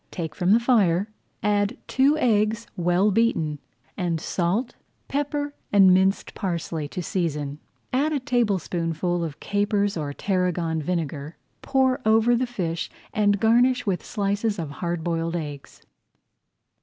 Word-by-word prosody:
Take 160 -4 -5
from 180 +2 -1
the 220 +4 +6
fire, 210 -6 +2 0.3
add 205 +2 +1
two 275 +4 +3
eggs 220 -4 +2
well 180 +4 +2
beaten, 175 -9 +1 0.4
and 170 -3 -1
salt, 190 +10 -1 0.3
pepper, 290 +1 -2 0.2
and 195 -2 +7
minced 190 +2 +2
parsley 170 -5 -3
to 180 +4 -5
season. 150 -5 -2 0.3
Add 285 +5 +2
a 295 - 0
tablespoonful 175 -8 0
of 155 -3 -5
capers 205 -1 0
or 150 -2 -3
tarragon 175 -2 -1
vinegar, 155 -2 -3 0.2
pour 265 -1 +2
over 225 +2 +4
the 250 +1 0
fish, 170 -8 -3 0.2
and 205 -3 +2
garnish 245 +4 +3
with 190 -4 -1
slices 205 +1 -1
of 160 -5 -4
hard 170 -2 -2
boiled 165 0 -1
eggs. 145 -4 -7
195 Hz, 130 wpm, -24 LUFS, 165-225 Hz, 0.4 s, and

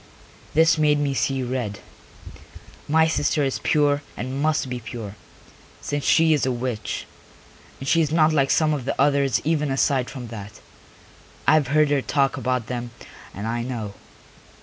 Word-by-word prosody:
This 160 0 +4
made 150 -1 +3
me 145 -1 0
see 135 0 0
red; 120 -5 -3 1.1
my 160 +2 +4
sister 150 -1 +1
is 135 -1 -1
pure 145 -1 +2 0.2
and 130 +3 -4
must 155 -2 +1
be 125 -1 -4
pure, 110 -3 -7 0.7
since 145 -1 -3
she 160 +2 +4
is 150 - +1
a 130 - +1
witch. 120 -3 -3 0.7
And 135 - -7
she 165 +3 +4
is 155 -2 0
not 160 -1 +4
like 135 -3 +2
some 155 -1 +3
of 140 -5 -3
the - - -3
others 140 -5 +2
even 150 -2 0
aside 135 -1 +1
from 125 -4 -8
that. 105 -2 -8 0.9
I - - +6
have 155 -4 +3
heard 150 +1 +3
her 145 -2 +2
talk 135 +4 +1
about 125 -3 -1
them 120 0 -4 0.4
and 100 +3 -7
I 115 +1 -2
know. 115 -5 -5
135 Hz, 170 wpm, -23 LUFS, 125-150 Hz, 1.1 s, I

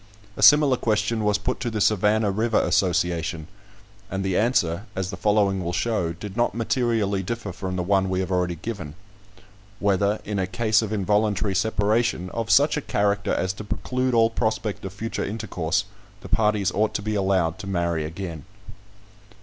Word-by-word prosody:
A - - -6
similar 145 -3 +7
question 110 0 0
was 105 0 +2
put 115 +5 -3
to 120 - -2
the 110 -2 -3
"Savannah 105 +1 +2
River 110 +3 +1
Association," 85 -3 0 0.6
and 95 0 -3
the 95 -2 0
answer, 100 -4 +1
as 95 0 -2
the - - -5
following 100 -1 +1
will 85 +1 -3
show, 90 -3 0
did 95 +3 -8
not 120 -1 +1
materially 115 -4 0
differ 110 +1 -4
from 95 +1 -5
the 90 - -1
one 95 0 +2
we 95 0 0
have 95 0 -2
already 90 -1 0
given: 85 -4 -6 0.8
"Whether, 100 +1 +1
in 105 -1 -2
a 95 - 0
case 110 +2 +2
of 110 -2 -4
involuntary 105 -1 +1
separation, 105 -2 0
of 115 -1 -3
such 145 +2 +4
a - - -1
character 100 -4 0
as 95 +1 0
to 110 - -8
preclude 125 +5 -1
all 115 0 +4
prospect 110 -2 -2
of 95 - -5
future 115 +3 -4
intercourse, 100 -2 -2 0.4
the - - -10
parties 105 -3 +2
ought 105 +3 0
to 105 - -2
be 110 0 -2
allowed 95 -3 +1
to 100 - -7
marry 85 -4 -1
again." 80 -1 -6
100 Hz, 175 wpm, -24 LUFS, 95-110 Hz, 0.8 s, similar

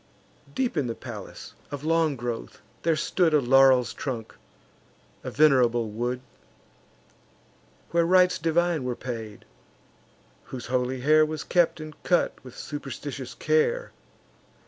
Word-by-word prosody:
Deep 260 -7 0
in 145 -5 0
the 115 - -3
palace, - - -9 0.2
of 145 -1 -6
long 160 -2 +2
growth, 120 -2 -5 0.2
there 165 -1 +2
stood 160 +1 +2
A - - +6
laurel's 130 -1 +5
trunk, 120 -5 -5 0.9
a - - -4
venerable 125 -6 +3
wood; 120 +3 -2 1.7
Where 170 0 +3
rites 180 0 +4
divine 165 -1 +1
were 125 -1 -2
paid; 115 -5 -7 1.0
whose 125 -2 -7
holy 125 0 -1
hair 155 +3 +5
Was 155 -1 -3
kept 175 -2 +2
and 155 0 -8
cut - - +2
with - - -12
superstitious - - -6
care. 475 +2 +1
145 Hz, 125 wpm, -26 LUFS, 125-165 Hz, 1.7 s, A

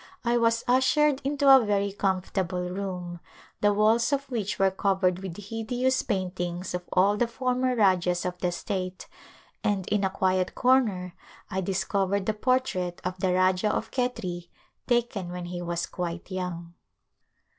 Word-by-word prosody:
I 235 0 +2
was 230 0 +2
ushered 265 +3 +3
into 280 0 0
a 270 -2 +9
very 200 -1 0
comfortable 185 -2 -1
room, 180 -2 -5 0.4
the 205 - +3
walls 220 +5 +3
of 280 0 0
which 215 -5 -2
were 195 0 +3
covered 190 -2 +1
with 190 -3 -7
hideous 240 +5 -1
paintings 180 -4 -3
of 180 - -2
all 200 +3 +3
the 240 - +2
former 255 +1 0
rajahs 180 -5 +2
of 180 0 -2
the 180 - 0
state 185 +1 -4 0.6
and 195 -3 0
in 210 -1 +1
a 190 - +2
quiet 185 -1 0
corner 215 -9 +2 0.4
I 190 - -1
discovered 195 +1 0
the 215 - +1
portrait 210 -7 0
of 185 0 -4
the 185 -1 +1
Rajah 185 +2 +2
of 225 - -3
Khetri, 210 -9 -3 0.4
taken 235 -7 0
when 180 0 -5
he 175 0 -5
was 170 -1 -2
quite 175 +1 -5
young. 175 -2 -4
195 Hz, 155 wpm, -27 LUFS, 180-230 Hz, 0.6 s, a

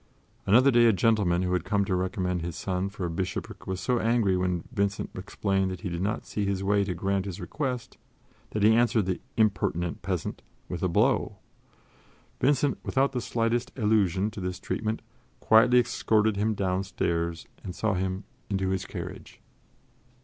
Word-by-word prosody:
Another 125 +7 +6
day 120 -1 +5
a 115 - +6
gentleman 95 -3 +2
who 90 0 0
had 90 -3 +1
come 100 -2 +1
to 95 - -1
recommend 90 -1 -1
his 85 -1 -4
son 95 0 -2
for 100 -2 -5
a - - -2
bishopric 90 +2 -4
was 95 -1 -2
so 125 +2 +1
angry 115 -4 +2
when 90 -2 0
Vincent 100 -4 -1
explained 95 0 -1
that 90 -1 -6
he 95 - -3
did 85 0 -3
not 100 +3 -1
see 105 - -3
his 100 -1 -1
way 100 +1 +3
to 95 -2 -3
grant 95 +2 -1
his 95 -4 -5
request 130 -5 -4 0.5
that 105 - -2
he 110 +1 +7
answered 115 -3 +3
the 95 -1 -2 0.2
"impertinent 90 -6 +1
peasant" - - -3 0.3
with - - -5
a - - +2
blow. - - +2 1.0
Vincent, 140 +1 +2
without 135 0 +1
the 125 -2 -2
slightest 115 +1 0
allusion 105 -3 +2
to 100 - -7
this 90 0 -3
treatment, 110 0 -3 0.4
quietly 120 +3 +5
escorted 110 -3 +2
him 105 +2 0
downstairs 90 -3 -1 0.2
and 90 - -6
saw 110 -2 0
him 95 +1 -2 0.3
into 95 -2 0
his 95 -1 -2
carriage. - - -8
100 Hz, 170 wpm, -27 LUFS, 90-110 Hz, 1.0 s, he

